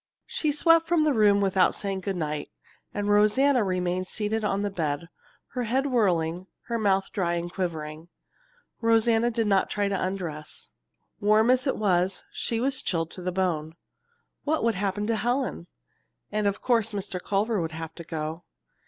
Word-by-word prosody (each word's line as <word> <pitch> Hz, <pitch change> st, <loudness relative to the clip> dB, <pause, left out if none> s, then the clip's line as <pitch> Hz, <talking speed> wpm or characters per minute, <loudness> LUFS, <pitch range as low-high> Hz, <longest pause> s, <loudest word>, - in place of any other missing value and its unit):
She 305 Hz, -, -1 dB
swept 330 Hz, +2 st, +4 dB
from 340 Hz, -2 st, +3 dB
the 305 Hz, -2 st, +3 dB
room 205 Hz, -3 st, +4 dB
without 190 Hz, -1 st, +3 dB
saying 195 Hz, -1 st, -3 dB
good 195 Hz, 0 st, -2 dB
night, 150 Hz, -3 st, -3 dB, 0.4 s
and 205 Hz, -1 st, -3 dB
Rosanna 215 Hz, +5 st, +4 dB
remained 185 Hz, -1 st, -1 dB
seated 215 Hz, +2 st, -2 dB
on 200 Hz, -1 st, 0 dB
the 205 Hz, -, -1 dB
bed, 160 Hz, -2 st, -2 dB, 0.4 s
her 250 Hz, -2 st, -3 dB
head 260 Hz, +5 st, +1 dB
whirling, 180 Hz, -, +1 dB, 0.2 s
her 235 Hz, -1 st, 0 dB
mouth 195 Hz, -2 st, +1 dB
dry 175 Hz, -3 st, 0 dB
and 175 Hz, +1 st, -4 dB
quivering. 160 Hz, -3 st, -4 dB, 0.7 s
Rosanna 230 Hz, 0 st, +3 dB
did 230 Hz, -1 st, 0 dB
not 195 Hz, -2 st, +2 dB
try 205 Hz, -1 st, 0 dB
to 195 Hz, -2 st, -1 dB
undress. 175 Hz, -5 st, -5 dB, 0.5 s
Warm 215 Hz, +3 st, +4 dB
as 255 Hz, +2 st, +2 dB
it 270 Hz, -, 0 dB
was, 190 Hz, -2 st, +1 dB
she 230 Hz, -, -2 dB
was 265 Hz, +2 st, 0 dB
chilled 165 Hz, -2 st, -1 dB
to 185 Hz, -, -9 dB
the 180 Hz, +1 st, -2 dB
bone. 165 Hz, -4 st, -1 dB, 0.7 s
What 310 Hz, -2 st, 0 dB
would 230 Hz, 0 st, +3 dB
happen 200 Hz, +1 st, -1 dB
to 225 Hz, +1 st, +1 dB
Helen? 240 Hz, -, -1 dB, 0.6 s
And 210 Hz, 0 st, +1 dB
of 200 Hz, 0 st, -1 dB
course 225 Hz, -3 st, +2 dB
Mr. 190 Hz, -2 st, -4 dB
Culver 205 Hz, +1 st, 0 dB
would 165 Hz, -1 st, -3 dB
have 160 Hz, 0 st, -6 dB
to 170 Hz, -, -9 dB
go. 160 Hz, +1 st, -5 dB
200 Hz, 170 wpm, -26 LUFS, 175-225 Hz, 0.7 s, swept